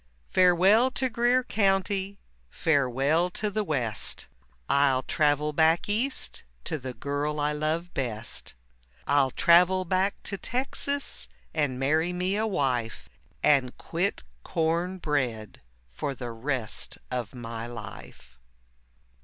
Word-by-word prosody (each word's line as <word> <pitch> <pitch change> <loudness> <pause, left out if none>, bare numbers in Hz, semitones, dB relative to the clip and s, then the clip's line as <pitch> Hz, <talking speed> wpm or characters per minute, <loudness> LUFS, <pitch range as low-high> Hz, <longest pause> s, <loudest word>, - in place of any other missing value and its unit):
Farewell 185 +7 +5
to 260 -2 +1
Greer 240 +2 +3
County, 195 -2 +1 0.3
farewell 145 - +2
to 210 +3 -2
the 215 +1 0
West, 125 - -2 0.4
I'll 140 -2 +3
travel 150 0 +1
back 160 +2 +3
East 235 +7 -1 0.2
to 155 - -2
the 130 -1 -6
girl 145 +1 -2
I 150 0 +1
love 155 +4 -2
best, 115 - -4 0.5
I'll 140 -2 +3
travel 180 +6 +4
back 190 +3 +1
to 200 - -4
Texas 275 +2 -1 0.3
and 145 -5 0
marry 155 +6 +1
me 180 +2 0
a 220 +1 +1
wife, 120 - -1 0.3
And 135 -4 +3
quit 175 - -2 0.2
corn 170 +3 0
bread 130 - -2 0.3
for 135 - -4
the 120 -2 -5
rest 115 -1 -3
of 125 -1 -3
my 115 -1 -6
life. 115 - -10
155 Hz, 120 wpm, -27 LUFS, 130-190 Hz, 0.5 s, Farewell